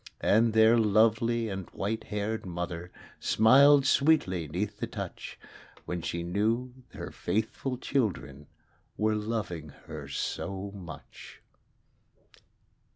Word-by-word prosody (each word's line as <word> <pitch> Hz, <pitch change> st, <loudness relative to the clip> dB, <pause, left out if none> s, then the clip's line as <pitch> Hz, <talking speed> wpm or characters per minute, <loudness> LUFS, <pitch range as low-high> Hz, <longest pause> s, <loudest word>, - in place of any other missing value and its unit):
And 110 Hz, +2 st, +3 dB
their 110 Hz, +1 st, +6 dB
loved 110 Hz, +1 st, +4 dB
and 115 Hz, -6 st, -2 dB
white 110 Hz, +3 st, -3 dB
haired 105 Hz, +1 st, -3 dB
mother 85 Hz, -1 st, -5 dB, 0.3 s
Smiled 135 Hz, +5 st, +6 dB
sweetly 135 Hz, -, +3 dB
'neath 100 Hz, +7 st, -3 dB
the 120 Hz, -, -2 dB
touch, 100 Hz, -5 st, -7 dB, 0.5 s
When 90 Hz, -1 st, -3 dB
she 85 Hz, +1 st, -3 dB
knew 110 Hz, +8 st, 0 dB, 0.2 s
her -, -, -6 dB
faithful 110 Hz, +6 st, -2 dB
children 90 Hz, -, -2 dB, 0.5 s
Were 110 Hz, 0 st, +2 dB
loving 105 Hz, -8 st, -3 dB, 0.2 s
her -, -, -8 dB
so 100 Hz, 0 st, -4 dB
much. 90 Hz, -5 st, -11 dB
105 Hz, 105 wpm, -29 LUFS, 90-115 Hz, 0.5 s, their